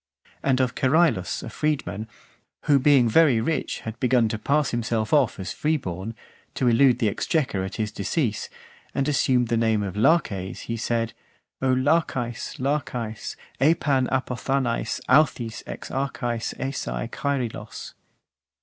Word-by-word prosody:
And 135 -2 +2
of 130 -1 +1
Cerylus, 135 - +2
a - - -6
freedman, 135 -8 -2 0.6
who 145 -2 +4
being 135 -3 +5
very 135 0 +5
rich, 145 +5 -2
had 110 0 -7
begun 125 -3 +3
to 110 - -3
pass 145 +4 +1
himself 115 -1 -1
off 140 -9 +3
as 95 - -4
free 155 +1 +1
born, 95 - -5 0.4
to 130 - +1
elude 120 +1 +5
the 115 - +1
exchequer 130 - 0
at 95 - -5
his 110 -1 -2
decease, 110 - -1 0.5
and 135 - 0
assumed 130 -4 +2
the 115 - +2
name 110 -2 +2
of 95 -1 -4
Laches, 105 - +1
he 115 - -4
said: 115 -1 -1 0.5
O 130 -1 +2
Lachaes, 130 -4 0
Lachaes, 125 -5 -2 0.2
Epan 140 -2 +3
apothanaes, 130 -2 -1
authis 125 -5 +2
ex - - -7
archaes 120 -4 -2
esae - - -3
Kaerylos. 125 -6 -4
125 Hz, 140 wpm, -24 LUFS, 110-140 Hz, 0.6 s, being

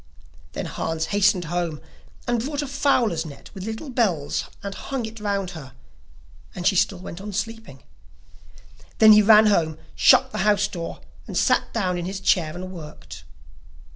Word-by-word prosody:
Then - - -4
Hans 160 0 -3
hastened 200 -3 +3
home 170 -2 -2 0.5
and 240 -1 0
brought 290 +2 -3
a - - -5
fowler's 250 - +1
net 150 -4 -11
with 190 -1 -7
little 225 +6 -6
bells 185 - 0 0.2
and 200 -1 -4
hung 265 +1 -4
it 220 0 -9
round 200 -3 -2
about 160 -5 -8
her, 130 -2 -14 0.8
and 175 - -5
she 195 - +4
still 190 +1 +2
went 175 0 -9
on 205 +1 -6
sleeping. 210 - -5 1.1
Then 220 -1 +8
he 210 - +7
ran 215 +1 +7
home, 160 -7 +2 0.2
shut - - +5
the - - -4
house 210 +1 +3
door, 170 -2 -7 0.3
and - - -4
sat - - +2
down 185 -5 -1
in 170 - -4
his 190 +1 -4
chair 175 -4 +1
and 185 +1 -7
worked. 70 - -10
195 Hz, 170 wpm, -23 LUFS, 170-220 Hz, 1.1 s, Then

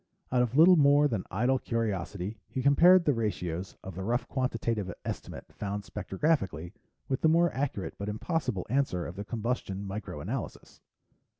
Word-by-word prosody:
Out 125 -1 +3
of 125 +2 0
little 175 +3 +8
more 145 0 +5
than 110 -9 -2
idle 125 +7 +1
curiosity, 105 -3 -3
he 130 - -4
compared 170 +6 +6
the 145 - +4
ratios 95 -6 -3
of 95 - -7
the 95 - -6
rough 120 +6 -1
quantitative 115 -7 -1
estimate - - -6
found 100 0 -4
spectrographically 95 - -1 0.3
with 130 - -1
the 160 - +4
more 170 +1 +3
accurate 130 -8 -3
but 100 +1 -3
impossible 120 - -2
answer 120 - 0
of 85 - -7
the 100 - -5
combustion 105 -3 -3
micro 100 +1 -5
analysis. - - -6
115 Hz, 160 wpm, -29 LUFS, 95-140 Hz, 0.3 s, little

